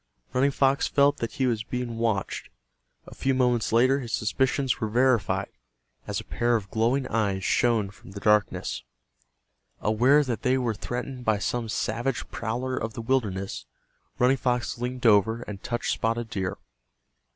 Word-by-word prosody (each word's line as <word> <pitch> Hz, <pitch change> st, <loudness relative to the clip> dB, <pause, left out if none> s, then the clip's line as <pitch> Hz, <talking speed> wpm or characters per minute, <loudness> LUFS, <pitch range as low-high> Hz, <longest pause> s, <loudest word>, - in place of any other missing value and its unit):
Running 135 Hz, +2 st, +3 dB
Fox 135 Hz, 0 st, +2 dB
felt 145 Hz, +1 st, +3 dB
that 115 Hz, -, -4 dB
he 130 Hz, -, 0 dB
was 115 Hz, -4 st, +1 dB
being 120 Hz, 0 st, -4 dB
watched. 110 Hz, -4 st, -1 dB, 0.6 s
A -, -, -11 dB
few 135 Hz, 0 st, 0 dB
moments 125 Hz, -3 st, +2 dB
later 130 Hz, +4 st, +4 dB
his 120 Hz, -4 st, -6 dB
suspicions 130 Hz, +4 st, 0 dB
were 110 Hz, -, 0 dB
verified, 120 Hz, -2 st, +2 dB, 0.6 s
as -, -, -2 dB
a -, -, -7 dB
pair 120 Hz, +1 st, 0 dB
of 100 Hz, -4 st, -3 dB
glowing 120 Hz, +5 st, +1 dB
eyes 100 Hz, -4 st, 0 dB
shone 110 Hz, -4 st, +2 dB
from 100 Hz, -, -16 dB
the 100 Hz, -, -6 dB
darkness. 105 Hz, 0 st, +1 dB, 1.0 s
Aware 125 Hz, +8 st, +4 dB
that 125 Hz, -5 st, -3 dB
they 130 Hz, -1 st, +2 dB
were 120 Hz, -3 st, 0 dB
threatened 125 Hz, +4 st, -5 dB
by 110 Hz, -3 st, +2 dB
some 115 Hz, +3 st, -2 dB
savage 120 Hz, +3 st, -2 dB
prowler 125 Hz, +3 st, -2 dB
of 110 Hz, -2 st, -3 dB
the -, -, -4 dB
wilderness, 105 Hz, -7 st, -1 dB, 0.5 s
Running 125 Hz, +2 st, +4 dB
Fox 125 Hz, -2 st, -1 dB
leaned 125 Hz, 0 st, -4 dB
over 110 Hz, +2 st, +4 dB
and 100 Hz, -2 st, -8 dB
touched 120 Hz, -1 st, -2 dB
Spotted 115 Hz, +1 st, -1 dB
Deer. 95 Hz, -5 st, -2 dB
120 Hz, 160 wpm, -26 LUFS, 110-130 Hz, 1.0 s, later